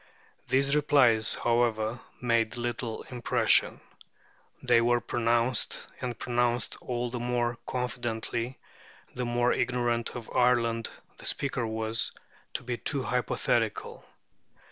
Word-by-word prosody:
These 140 +2 +3
replies, 130 -7 +4
however, 115 -1 +1 0.2
made 115 0 +1
little 120 -1 -3
impression. 120 -2 +3 0.8
They 115 - +5
were 120 +1 +3
pronounced, 120 0 0 0.2
and 125 -2 -3
pronounced 120 -1 0
all 120 -1 -3
the 125 - -3
more 120 -1 -1
confidently 120 -1 -3 0.6
the 125 - -3
more 120 +1 +2
ignorant 120 -1 0
of 120 -2 -8
Ireland 115 -2 +2 0.3
the - - -6
speaker 135 -4 0
was, 110 0 -1 0.4
to - - -3
be 125 -1 -3
too 130 +4 0
hypothetical. 125 -1 -1
120 Hz, 110 wpm, -29 LUFS, 115-125 Hz, 0.8 s, They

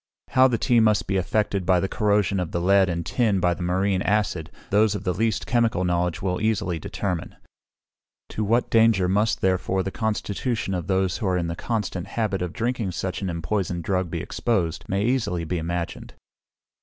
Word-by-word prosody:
How 130 0 +5
the 120 -3 0
tea 120 +1 +3
must 110 -2 +3
be 100 - -2
affected 100 +1 0
by 90 0 +3
the 95 - 0
corrosion 100 -2 +1
of 90 -3 -2
the 85 - -1
lead 95 +1 +4
and 85 -1 -2
tin 110 -4 +1
by 90 -1 +2
the 90 - -8
marine 95 +2 +1
acid, 100 -6 0 0.2
those 105 +1 +3
of 100 - -5
the 90 - 0
least 110 +3 0
chemical 115 -6 +1
knowledge 90 0 0
will 90 0 -1
easily 105 -6 0
determine. 90 +2 -4 0.9
To 110 - -3
what 115 +4 +1
danger 110 -5 +4
must, 105 +4 +1
therefore, 95 0 +1
the 95 - -3
constitution 110 0 -2
of 90 -2 -3
those 95 -2 +1
who 110 - -1
are 90 -1 +1
in 85 - -1
the 85 - -3
constant 100 -3 -3
habit 105 -5 -1
of 90 -2 -2
drinking 115 -4 -2
such 95 +2 -3
an 95 - -2
empoisoned 85 +1 -2
drug 95 -1 -1
be - - -3
exposed, 90 -9 -1
may 100 +2 0
easily 115 -9 0
be 85 +2 -2
imagined. 85 +1 -4
95 Hz, 195 wpm, -24 LUFS, 90-110 Hz, 0.9 s, How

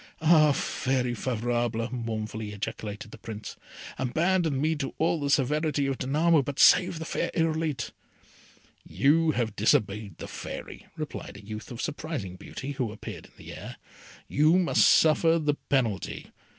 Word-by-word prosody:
"Ah, 155 -2 +6
Fairy 130 -2 -1
Favourable," 120 -1 -1
mournfully 110 -2 -4
ejaculated 105 +1 -6
the - - -11
Prince, 110 -1 -7 0.4
"abandon 160 +3 +1
me 155 +3 +1
to 135 -3 -4
all 165 +1 +1
the 140 -1 -2
severity 145 +1 +1
of 135 -1 -2
Danamo, 155 +4 +3
but 140 +1 -5
save 180 -2 +6
the 160 - -5
fair - - -1
Irolite!" 160 -7 0 0.9
"You 145 - +3
have 115 -4 -1
disobeyed 105 -1 +1
the - - -7
Fairy," - - -8
replied - - -6
a 100 - -13
youth 110 0 -7
of 120 0 -6
surprising 150 - -4
beauty, 135 +8 -7
who 130 -6 -2
appeared 105 - -9
in - - -26
the - - -10
air. - - -8 0.5
"You 155 +5 +4
must 180 -2 +4
suffer 165 +1 +5
the 150 -2 +1 0.2
penalty. 115 -8 -1
135 Hz, 150 wpm, -27 LUFS, 110-155 Hz, 0.9 s, Ah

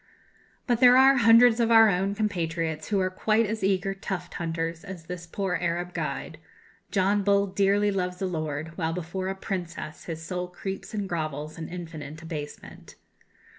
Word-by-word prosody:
But 240 -2 +1
there 250 0 +8
are 270 +1 +7
hundreds 230 0 +6
of 230 -1 +2
our 225 -1 +8
own 195 +1 +1
compatriots 165 -6 -2
who 205 -2 +1
are 185 0 0
quite 215 +4 +2
as 220 0 -3
eager 195 0 +1
tuft 195 -1 -5
hunters 165 0 -3
as 190 -4 -8
this 175 0 -7
poor 190 +1 -2
Arab 175 +1 -2
guide! - - -4 0.5
John 200 +1 +2
Bull 200 0 +3
dearly 200 +1 +2
loves 180 -2 -2
"a 195 - -1
lord," 155 -2 -4
while 165 -1 0
before 180 +2 -4
"a 190 - -2
princess" 175 -5 -5
his 165 -2 -5
soul 180 +1 -3
creeps 190 +4 -6
and 205 -2 -2
grovels 155 -3 -4
in 160 - -6
infinite 155 -4 -7
abasement. 155 -3 -8
185 Hz, 170 wpm, -27 LUFS, 165-200 Hz, 0.5 s, there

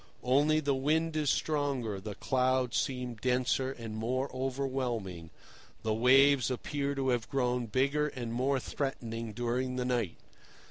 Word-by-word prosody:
Only 145 +5 +3
the 140 -2 +1
wind 155 +4 +1
is 150 -2 +1
stronger, 135 -11 0
the 105 0 -6
clouds 130 -1 +1
seem 125 -2 -1
denser 130 +3 0
and 115 -4 -7
more 130 +4 -2
overwhelming, 125 -10 -2 0.5
the 110 -1 +1
waves 130 +3 +5
appear 140 +2 -2
to 135 -1 0
have 120 -3 0
grown 125 -3 0
bigger 140 +6 +1
and 120 -5 -5
more 130 +3 +1
threatening 115 -5 -4
during 120 +3 -1
the 125 -1 -1
night. 120 -9 -1
130 Hz, 140 wpm, -31 LUFS, 120-140 Hz, 0.5 s, waves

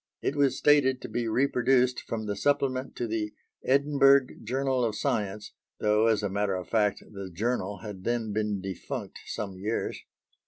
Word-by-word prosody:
It 140 - 0
was 140 -2 +2
stated 135 -3 +4
to - - -4
be 120 -1 -2
reproduced 125 +1 +2
from 110 -1 -4
the 105 -1 -2
Supplement 135 +1 0
to 120 - -2
the 110 -2 -3 0.3
Edinburgh 140 -1 +4
Journal 130 +2 0
of 110 -3 0
Science, 105 -6 -2 0.3
though 105 +1 +3
as 110 -2 +2
a - - +1
matter 100 0 0
of 90 -1 -5
fact, 105 -3 +1
the 100 -2 -7
Journal 105 +1 -2
had 100 -4 -7
then 115 -2 -1
been 105 -2 -1
defunct 95 -2 -6
some 100 -3 -5
years. 105 +4 -2
115 Hz, 165 wpm, -28 LUFS, 105-130 Hz, 0.3 s, stated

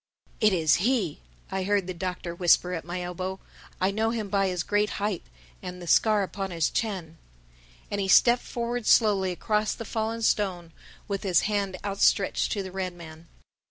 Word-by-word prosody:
"It 215 - +4
is 160 -4 +3
he!" 205 - 0 0.3
I 190 - -1
heard 200 0 +1
the 185 - -4
Doctor 180 -1 -4
whisper 175 +1 +3
at 165 - -3
my 175 +2 -5
elbow. 185 +2 -4 0.4
"I 185 +1 +2
know 220 +2 0
him 225 -3 -3
by 195 -1 +2
his 180 -2 -1
great 210 0 +1
height 205 -3 -1 0.4
and 180 0 -7
the 175 - -8
scar 210 +4 +4
upon 195 0 -4
his 165 -4 0
chin." 180 -8 -3 0.7
And 205 - -1
he 195 - -1
stepped 240 +5 +6
forward 240 -1 -4
slowly 200 -5 +4
across 210 +4 0
the 230 - -7
fallen 225 +1 -2
stone 180 -6 0 0.4
with 200 -2 -2
his 185 -4 +3
hand 200 -3 -1
outstretched 200 0 +2
to 200 - -2
the 190 - -7
red 185 -1 -3
man. 165 -1 -12
195 Hz, 180 wpm, -27 LUFS, 180-210 Hz, 0.7 s, stepped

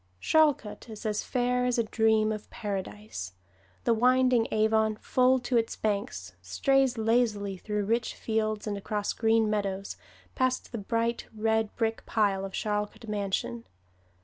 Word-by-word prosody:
Charlcote 290 - +2
is 220 -1 -9
as 210 -1 0
fair 250 0 0
as 250 -1 +1
a 235 - +3
dream 220 -1 +2
of 215 -1 -6
Paradise. 205 - -5 0.5
The 235 - +3
winding 250 0 +3
Avon, 220 0 +2
full 255 +4 +3
to 245 0 +1
its 225 -1 0
banks, 200 - -3
strays 260 - +2
lazily 220 -3 +1
through 210 +2 -3
rich 230 +3 0
fields 215 -1 -1
and 205 -2 -3
across 205 +1 -2
green 225 -1 +2
meadows, 200 -2 -2 0.4
past 255 0 0
the 235 - -4
bright 230 +3 -1
red 220 0 0
brick 225 -1 -1
pile 200 -3 +1
of 195 - -6
Charlcote 210 +2 -3
Mansion. 210 +3 -2
220 Hz, 145 wpm, -28 LUFS, 210-235 Hz, 0.5 s, a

